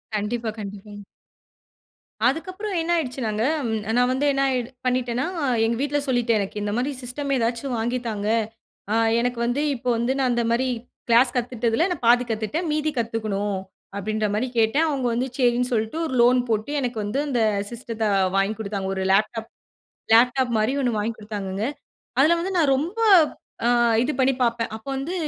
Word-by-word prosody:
கண்டிப்பா, 220 +2 -2
கண்டிப்பாங்க. 205 0 -8 1.2
அதுக்கப்பறம் 370 +7 -2
என்ன 340 +1 -2
ஆயிடுச்சுனாங்க, 245 -7 -2 0.2
ம். 220 -1 -1 0.2
நான் 245 0 +3
வந்து 270 +3 0
என்ன 275 0 0
ஆயி 255 -2 +1 0.2
பண்ணிட்டேனா, 250 +1 0 0.4
எங்க 230 +1 +1
வீட்ல 290 0 0
சொல்லிட்டேன். 240 -3 +2
"எனக்கு 200 +1 -3
இந்த 205 0 -2
மாரி 265 +4 0
சிஸ்டம், 275 +3 -4
ஏதாச்சும் 240 +2 -1
வாங்கி 240 +3 -1
தாங்க. 210 -2 -3 0.6
அ - - +2 0.2
எனக்கு 245 0 -1
வந்து 245 +5 0
இப்போ 250 +1 -3
வந்து 235 +3 0
நான் 255 -2 +2
அந்த 235 0 +1
மாரி 255 +2 +1 0.4
கிளாஸ் 240 +2 +5
கத்துட்டதில 240 +3 0
நான் 345 - -4
பாதி 245 +1 +6
கத்துட்டேன், 225 - -2
மீதி 305 0 0
கத்துக்கணும்." 215 -3 -1 0.4
அப்படீன்ற 215 +2 -1
மாரி 250 +5 0
கேட்டேன். 275 +9 +3
அவங்க 270 -4 -1
வந்து 250 +3 0
சரின்னு 245 0 +2
சொல்லிட்டு, 220 +7 -1
ஒரு 260 - -5
லோன் 250 +1 +5
போட்டு 220 +5 -1
எனக்கு 245 -3 -3
வந்து 225 +8 -1
அந்த 245 -4 0 0.3
சிஸ்டத்த 230 -2 -5
அ - - +3 0.2
வாங்கிக் 205 +3 0
குடுத்தாங்க. 200 -2 -3
ஒரு 190 - -2
லேப்டாப் 220 +3 +1 0.6
லேப்டாப் 245 +2 +4
மாரி 220 +5 +1
ஒண்ணு 240 -4 0
வாங்கி 225 +2 -1
குடுத்தாங்கங்க. 205 -1 -4 0.5
அதில 310 +5 +6
வந்து 375 +3 -2
நான் 295 -5 +3
ரொம்ப, 345 +11 -3 0.7
அ - - +4 0.4
இது 300 - 0
பண்ணி 265 +1 +3
பார்ப்பேன். 230 -2 0
அப்போ 220 +4 -12
வந்து 300 +7 -4
240 Hz, 165 wpm, -23 LUFS, 220-265 Hz, 1.2 s, பாதி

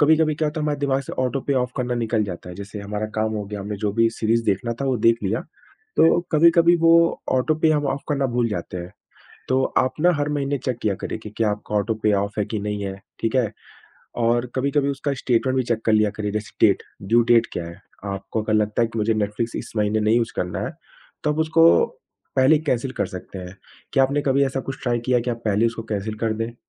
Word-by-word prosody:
कभी-कभी 155 0 +4
क्या 155 0 0
होता 155 +1 -4
है - - -1
हमारे 150 -1 -1
दिमाग 135 -1 +1
से - - -8
ऑटो 130 +1 -1
पे 140 - +3
ऑफ़ 125 - -4
करना 125 -2 -1
निकल 115 -2 0
जाता 90 -2 -7
है। 90 - -7
जैसे 100 +1 -7
हमारा 105 +1 -3
काम 110 0 0
हो 105 -1 -3
गया। 105 -1 -6
हमने 105 +1 -4
जो 100 - +1
भी 115 +1 +3
सीरीज़ 115 +1 0
देखना 115 +4 0
था - - 0
वो 130 -2 +1
देख 115 0 +5
लिया 110 +5 0 0.6
तो 165 +1 +5
कभी-कभी 170 +2 +5
वो 165 0 +6 0.4
ऑटो 130 +4 +2
पे 160 - +6
हम 145 -2 +1
ऑफ़ 140 - -1
करना 140 -2 +1
भूल 120 -1 +2
जाते 90 -2 -4
हैं। 90 +2 -7 0.6
तो 130 0 +3 0.2
आप 130 - +1
ना 180 +2 +5
हर 145 - 0
महीने 140 0 -1
चेक 125 -2 -3
किया 100 -3 +1
करिए - - -3
कि 105 - -7
क्या 110 -2 +2
आपका 105 +1 -5
ऑटो 110 +2 +1
पे 105 - +4
ऑफ़ 100 +1 -5
है 105 - +1
कि 110 0 -3
नहीं 105 0 -3
है। 95 0 -4 0.3
ठीक 115 +3 0
है? 120 -5 +2 0.7
और 120 +1 +2
कभी-कभी 140 +1 +1
उसका 140 +1 -2
स्टेटमेंट 130 +2 +1
भी - - +3
चेक 115 -2 -2
कर 110 - +2
लिया 110 -1 +4
करिए। 105 -1 -1
जैसे 105 -2 -5
डेट, - - +1 0.2
ड्यू 115 +5 +3
डेट 115 -1 +5
क्या 85 - -3
है। 85 0 -10 0.3
आपको 100 +3 -4
अगर 110 0 0
लगता 105 +2 +2
है 115 - +1
कि 115 -1 -6
मुझे 110 +1 +2
नेटफ्लिक्स 110 +2 -2
इस - - -6
महीने 105 +1 +1
नहीं 110 +2 +3
यूज़ 120 -1 0
करना 90 -1 -2
है - - -5 0.5
तो 150 - +2
आप 150 - -5
उसको 160 +1 +4 0.7
पहले 135 +4 +5
कैंसल 135 -4 -1
कर - - +1
सकते 95 0 -8
हैं। 90 +1 -9 0.4
क्या 135 - +4
आपने 140 +2 0
कभी 140 0 +3
ऐसा 135 0 -2
कुछ 135 - -5
ट्राई 120 -2 0
किया 125 -1 +3
कि 125 - +1
आप 115 - -2
पहले 105 +2 +2
उसको 115 0 -3
कैंसल 105 +1 -2
कर 110 -1 +2
दें? 115 +1 -4
115 Hz, 245 wpm, -23 LUFS, 105-135 Hz, 0.7 s, वो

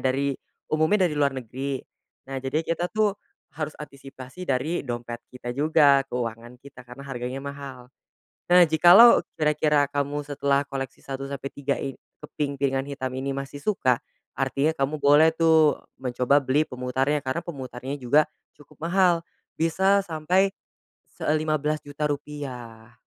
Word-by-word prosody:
dari 135 +1 0 0.4
umumnya 160 +6 +3
dari 170 - +1
luar 140 -2 +1
negeri. 130 +3 -4 0.5
Nah, 135 0 -5
jadi 140 +5 -2
kita 170 +1 -1
tuh 215 -1 +1 0.4
harus 155 -1 -5
antisipasi 140 +3 -10
dari 140 +6 0
dompet 120 -2 -5
kita 120 -1 -7
juga, 145 0 +4
keuangan 120 0 -5
kita, 135 0 -14
karena 130 +3 -10
harganya 130 -1 -5
mahal. 135 -2 -8 0.6
Nah, 180 0 +7
jikalau 175 +9 +7 0.2
kira-kira 150 -1 +2
kamu 145 +1 -2
setelah 140 0 0
koleksi 135 -2 -6
1 135 0 -5
sampai 140 0 -5
3 140 0 -2
i 135 - -4 0.2
keping 140 -1 -4
kepingan 135 -1 0
hitam 130 -2 -4
ini 130 +1 -3
masih 140 +1 -5
suka, 130 - +1 0.3
artinya 140 +3 0
kamu 145 +1 -1
boleh 145 +3 +6
tuh 160 -2 +4 0.2
mencoba 125 +2 +2
beli 140 +3 +1
pemutarnya, 130 +3 -1
karena 135 +5 -3
pemutarnya 130 -4 -6
juga 145 +5 +4 0.3
cukup, 145 - -20
mahal 180 -2 +3 0.3
bisa 190 +5 +2
sampai 180 +2 +1 0.6
se - - -8
eee, 155 0 +2
Rp15.000.000 150 -1 -2
rupiah. 125 -6 -6
140 Hz, 140 wpm, -25 LUFS, 130-155 Hz, 0.6 s, Nah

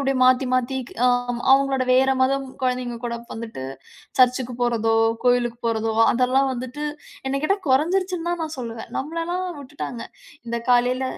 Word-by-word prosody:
அப்டியே 270 -1 0
மாத்தி 255 +1 +4
மாத்திக் 255 0 -1
ஆ, - - +6 0.3
ஆமா. 240 - -5
அவுங்களோட 270 -1 +3
வேற 265 +1 +4
மதம் 270 +1 +1 0.2
குழந்தைங்க 250 -1 -1
கூட 235 -1 -2 0.2
வந்துட்டு, 225 -12 -6 0.5
சர்ச்சுக்கு 250 -1 +3
போறதோ, 225 -2 +2 0.3
கோயிலுக்கு 245 -1 +2
போறதோ, 225 -1 0 0.2
அதெல்லாம் 260 +2 +2
வந்துட்டு, 255 +4 -5 0.4
என்ன 275 +1 -1
கேட்டா 395 +6 +2
கொறஞ்சிருச்சுன்னு 345 +5 +1
தான் 345 -1 -2
நான் 310 -1 -6
சொல்லுவேன். 230 -2 -6
நம்மளலாம் 335 +5 -3
விட்டுட்டாங்க. 255 -4 -6 0.5
இந்த 235 0 -1
காலையில 250 +1 +3
255 Hz, 145 wpm, -23 LUFS, 240-275 Hz, 0.5 s, ஆ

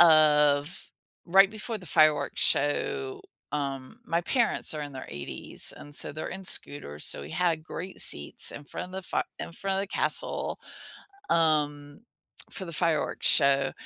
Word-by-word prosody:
of 150 -2 +3 0.3
right 195 +3 +4
before 220 +1 -6
the 180 - -13
fireworks 150 -2 +2
show 400 - -1 0.3
um 135 -3 -5
my 170 +1 0
parents 235 -5 0
are 150 - -5
in 145 -1 -8
their 130 - -9
80s, 70 0 +1
and 145 - -10
so - - +1
they're 155 +2 -6
in 190 0 -8
scooters, 75 - -1
so - - +3
we 75 - -10
had 165 - -1
great 180 +4 -6
seats 75 - +6
in 145 - -10
front 180 - -7
of 185 - -15
the 190 - -6
fire - - -2 0.2
in - - -8
front 195 +2 -4
of - - -1
the - - -5
castle, - - 0 0.7
um, 150 -3 0 0.5
for 190 - -6
the 170 - -8
fireworks 165 -2 -1
show, 140 -1 +3
155 Hz, 165 wpm, -26 LUFS, 145-185 Hz, 0.7 s, seats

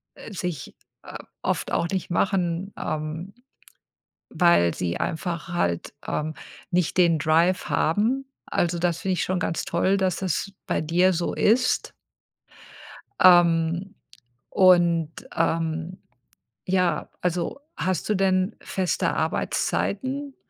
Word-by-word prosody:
äh, 220 - -10
sich, 180 -7 -5 0.3
o - - -11 0.3
oft - - -2
auch 170 - +1
nicht 190 -1 -3
machen, 180 0 0
ähm, 155 +5 -4 1.0
weil 170 - +3
sie 85 -1 -2
einfach 170 0 -3
halt, 90 - -2
ähm, 155 +1 -2 0.4
nicht 175 -2 0
den 170 -3 +4
Drive 165 +4 +2
haben. 225 +11 +1 0.2
Also, 175 0 0
das 170 -1 0
finde 190 0 0
ich - - 0
schon 185 0 -1
ganz 165 0 -2
toll, 185 +3 +1
dass 190 -2 0
das 190 +1 -2
bei - - 0
dir 175 +4 +3
so 170 +1 -1
ist. 250 +4 +2 1.3
Ähm, 175 0 +4 0.5
und, 175 -4 +4 0.2
ähm, 165 +2 -1 0.7
ja, 185 -1 0
also 180 +6 -2 0.2
hast 185 -3 -1
du 210 - +2
denn 185 0 +1
feste 185 -2 -1
Arbeitszeiten? 265 +6 -1
175 Hz, 115 wpm, -24 LUFS, 165-190 Hz, 1.3 s, den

